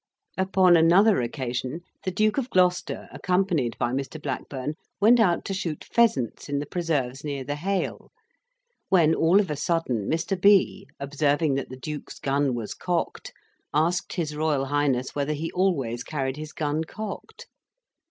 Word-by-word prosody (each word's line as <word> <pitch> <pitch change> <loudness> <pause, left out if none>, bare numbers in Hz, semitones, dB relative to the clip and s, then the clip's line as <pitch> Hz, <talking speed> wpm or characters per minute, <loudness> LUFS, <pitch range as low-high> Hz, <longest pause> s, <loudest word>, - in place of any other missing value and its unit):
Upon 190 -1 +4
another 180 - +5
occasion 125 +4 -3 0.2
the - - +1
Duke 215 +6 +1
of 260 -1 -4
Gloucester, 180 -3 +1
accompanied 180 -10 0
by 120 - 0
Mr. 135 +4 -3
Blackburn, 140 0 -4 0.3
went 230 +4 +6
out 180 -6 +2
to 195 - -3
shoot 170 -5 -3
pheasants 150 - +1
in 145 - 0
the 145 - -2
preserves 145 -6 -2
near 140 -3 -3
the 145 +3 -3
Hale; 190 +4 -3 0.8
when 165 -4 +5
all 170 +5 +4
of 190 -6 0
a - - -1
sudden, 145 - -1
Mr. 180 +3 -1
B. 195 0 +4
observing 145 +2 +1
that 135 -1 -2
the 130 - -8
Duke's 150 +3 -7
gun 140 -1 0
was 115 -3 -4
cocked, 175 -2 -3 0.4
asked 170 +4 +1
his 155 -4 -2
Royal 150 -3 0
Highness 135 -2 0
whether 145 +1 -1
he 160 +2 -4
always 135 -11 0
carried 135 -3 -3
his 155 0 -7
gun 155 0 -1
cocked. 215 +5 -8
155 Hz, 155 wpm, -25 LUFS, 135-180 Hz, 0.8 s, went